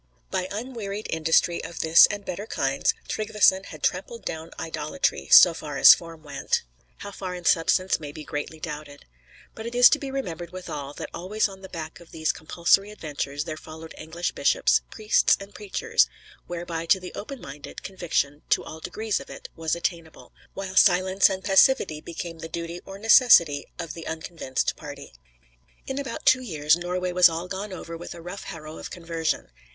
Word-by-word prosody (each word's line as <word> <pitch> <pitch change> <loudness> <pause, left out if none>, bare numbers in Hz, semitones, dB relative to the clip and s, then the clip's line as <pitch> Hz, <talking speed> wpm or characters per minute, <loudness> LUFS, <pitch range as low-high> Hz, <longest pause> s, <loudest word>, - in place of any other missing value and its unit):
By 185 - -1
unwearied 215 -2 -5
industry 165 +2 +2
of 170 - -5
this 160 +1 +8
and 205 -1 -6
better 200 +5 -5
kinds, 135 -7 0
Tryggveson 210 -3 +2
had - - -11
trampled 470 -1 -2
down 160 0 -5
idolatry, 150 - -2
so 175 - +9
far 150 -3 -6
as - - +10
form 165 -2 -8
went, 145 - -2 0.3
how 200 - -8
far 185 -2 -6
in 175 -1 -9
substance 185 +3 +3
may 150 -2 -7
be 155 +1 -9
greatly 150 +1 -5
doubted. 150 -2 -8 0.5
But 220 +1 -7
it 235 - -6
is 245 0 +9
to 300 - +3
be 275 - -5
remembered 175 -11 -5
withal, 150 -6 -6
that - - -7
always 210 +5 0
on 190 -1 -12
the 190 - -10
back 160 -2 -7
of 170 - -16
these 160 -1 0
compulsory 170 +5 +1
adventures 145 -7 -4
there 155 -1 -5
followed 160 +1 -10
English 165 +3 -4
bishops, - - +2
priests, 215 -1 +3
and 195 +1 -11
preachers; 455 - +1 0.4
whereby 170 -1 -5
to 190 - +4
the 180 -1 -9
open 270 +5 -7
minded, 140 -4 -10
conviction, 155 -6 -2
to - - +3
all 160 - -9
degrees 215 +5 -2
of - - -11
it, - - -10
was 160 -1 -1
attainable, 170 -2 -5 0.2
while 190 -1 -5
silence 185 +1 +5
and 190 0 -4
passivity 190 -6 +4
became 170 0 -7
the 165 - -7
duty 170 +1 -5
or 195 0 -8
necessity 200 - +6
of 160 - -5
the 165 - -8
unconvinced 160 -4 -3
party. 145 - -10 0.7
In 265 +1 -3
about 275 -2 -6
two 260 0 +5
years 155 -9 +2
Norway 180 +1 -2
was 180 0 +7
all 165 +2 -4
gone 195 +2 -5
over 170 -2 -7
with 175 +1 -8
a - - -10
rough 180 +3 -7
harrow 155 -1 -8
of - - -7
conversion. 165 -2 -3
170 Hz, 180 wpm, -25 LUFS, 160-195 Hz, 0.7 s, as